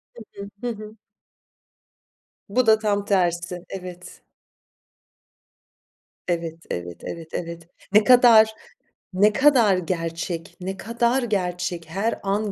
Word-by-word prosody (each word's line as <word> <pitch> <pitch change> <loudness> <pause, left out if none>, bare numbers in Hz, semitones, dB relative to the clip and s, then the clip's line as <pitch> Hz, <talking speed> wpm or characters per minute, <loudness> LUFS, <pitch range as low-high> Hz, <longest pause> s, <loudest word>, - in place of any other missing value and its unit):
Hı 235 - -10 0.2
hı. 200 0 -7
Hı 245 - -3
hı. 215 +1 -10 1.5
Bu 250 +4 +2
da 220 -1 +6
tam 205 -2 0
tersi. 175 -2 0
Evet. 180 -2 -9 2.0
Evet, 165 -2 -2
evet, 85 0 -6
evet, 165 -1 -7
evet. 170 -1 -6 0.3
Ne 215 +1 +6
kadar, 235 -3 +7 0.6
ne 205 +3 +4
kadar 240 -7 +4
gerçek, 165 -1 -4
ne 190 +1 -4
kadar 235 +4 0
gerçek, 180 -5 -2
her 200 +7 -2
an 200 +1 -1
195 Hz, 110 wpm, -23 LUFS, 175-220 Hz, 2.0 s, kadar